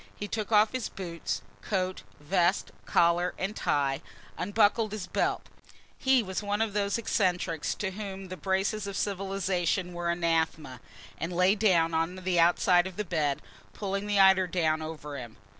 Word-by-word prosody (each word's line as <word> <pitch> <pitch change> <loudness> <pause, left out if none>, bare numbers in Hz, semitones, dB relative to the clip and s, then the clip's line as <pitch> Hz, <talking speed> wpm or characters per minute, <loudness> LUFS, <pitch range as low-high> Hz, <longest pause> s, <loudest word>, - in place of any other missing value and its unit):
He 205 - -5
took 215 0 -4
off 215 0 +5
his 255 -3 -3
boots, 170 - -4 0.2
coat, 185 -2 -2 0.2
vest, 175 +4 +1 0.2
collar 170 +1 +3
and 195 +3 -3
tie, 135 -2 0 0.3
unbuckled 210 +2 +2
his 210 -4 -4
belt - - -1 0.5
he 265 -2 +3
was 190 0 -3
one 205 0 -1
of 220 -2 0
those 200 0 0
eccentrics 180 -7 0
to 190 -2 -3
whom 195 -1 -7
the 185 - -5
braces 195 +2 -1
of 200 - -4
civilisation 190 -2 -1
were 175 0 -2
anathema 160 -6 -1 0.4
and 165 - -3
lay 180 +2 +4
down 180 -6 +3
on 165 +3 0
the 185 -1 0
outside 175 +1 +4
of 190 - -9
the 210 - -2
bed, 155 -5 -1 0.3
pulling 200 0 -3
the 205 -1 +2
eiderdown 180 -5 +4
over 150 -3 -6
him. 120 -3 -10
185 Hz, 160 wpm, -29 LUFS, 170-200 Hz, 0.5 s, off